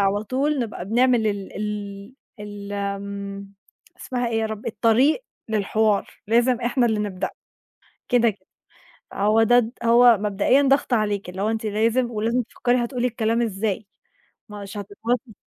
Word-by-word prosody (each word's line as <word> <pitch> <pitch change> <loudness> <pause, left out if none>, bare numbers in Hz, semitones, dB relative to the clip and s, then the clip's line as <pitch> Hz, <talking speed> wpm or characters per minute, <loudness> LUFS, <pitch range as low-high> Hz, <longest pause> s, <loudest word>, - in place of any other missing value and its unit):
على 200 +1 +1
طول 275 +6 0
نبقى 215 -6 -4
بنعمل 240 +2 +3
ال 200 -2 -3
ال 210 +1 -5 0.3
ال 205 -1 -8
آمم، 200 0 -5 0.5
اسمها 245 -2 -2
إيه 225 -1 0
يا 220 - 0
رب؟ 220 0 -7
الطريق 235 - +2 0.2
للحوار، 215 0 +1 0.2
لازم 240 +3 +3
إحنا 240 +1 +1
اللي 220 -2 0
نبدأ، 195 -3 -3 0.8
كده 240 -1 +4
كده، 190 -3 -10 0.7
هو 215 +3 +3
ده 245 +2 +5
د 225 -1 -2
هو 235 -1 +6
مبدئيًا 210 +6 +2
ضغط 275 -1 +2
عليكِ، 205 -4 0
اللي 190 +2 -6
هو 215 - +1
أنتِ 225 0 -2
لازم 230 +4 +1
ولازم 230 +3 0
تفكّري 245 +2 0
هتقولي 250 0 -1
الكلام 230 0 0
إزاي، 210 -1 -2 0.6
مش 205 -1 -8
هتتواصلي 220 +3 -3
220 Hz, 145 wpm, -23 LUFS, 205-240 Hz, 0.8 s, هو